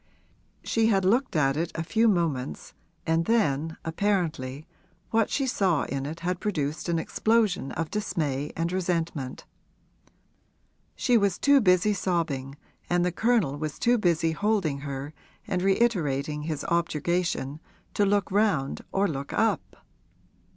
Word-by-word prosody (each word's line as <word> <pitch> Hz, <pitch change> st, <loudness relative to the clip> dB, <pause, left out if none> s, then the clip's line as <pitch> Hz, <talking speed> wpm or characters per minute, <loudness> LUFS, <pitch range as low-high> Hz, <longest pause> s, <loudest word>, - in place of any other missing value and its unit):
She 225 Hz, -1 st, +2 dB
had 195 Hz, -4 st, +2 dB
looked 240 Hz, +3 st, +2 dB
at 135 Hz, -3 st, +3 dB
it 165 Hz, +2 st, -2 dB
a 160 Hz, -, -2 dB
few 225 Hz, +7 st, +2 dB
moments 165 Hz, -, -1 dB, 0.3 s
and 165 Hz, +1 st, +1 dB
then 160 Hz, -8 st, +1 dB
apparently 160 Hz, -6 st, -1 dB, 0.5 s
what 225 Hz, -1 st, +2 dB
she 275 Hz, -, 0 dB
saw 190 Hz, -, +1 dB
in 135 Hz, 0 st, -3 dB
it 160 Hz, +3 st, -7 dB
had 180 Hz, +1 st, -1 dB
produced 155 Hz, -5 st, -2 dB
an 170 Hz, -, +1 dB
explosion 215 Hz, -3 st, +1 dB
of 165 Hz, -1 st, -3 dB
dismay 150 Hz, -9 st, -2 dB
and 165 Hz, +1 st, -1 dB
resentment. 170 Hz, -7 st, -2 dB, 1.5 s
She 245 Hz, -3 st, +3 dB
was 200 Hz, -3 st, +1 dB
too 280 Hz, -1 st, +5 dB
busy 185 Hz, +1 st, +4 dB
sobbing 165 Hz, -8 st, -2 dB, 0.3 s
and 175 Hz, 0 st, +2 dB
the 180 Hz, -, +1 dB
Colonel 195 Hz, -, +1 dB
was 155 Hz, -1 st, -4 dB
too 240 Hz, 0 st, +2 dB
busy 165 Hz, -4 st, +2 dB
holding 190 Hz, -6 st, 0 dB
her 140 Hz, +1 st, -6 dB, 0.3 s
and 180 Hz, -, -1 dB
reiterating 155 Hz, -, +1 dB
his 155 Hz, -1 st, -3 dB
objurgation, 170 Hz, -3 st, -1 dB, 0.3 s
to 205 Hz, -, +2 dB
look 200 Hz, -1 st, +1 dB
round 195 Hz, -10 st, +1 dB
or 195 Hz, +1 st, +2 dB
look 140 Hz, -4 st, -5 dB
up. 225 Hz, +1 st, -1 dB
170 Hz, 135 wpm, -27 LUFS, 150-205 Hz, 1.5 s, too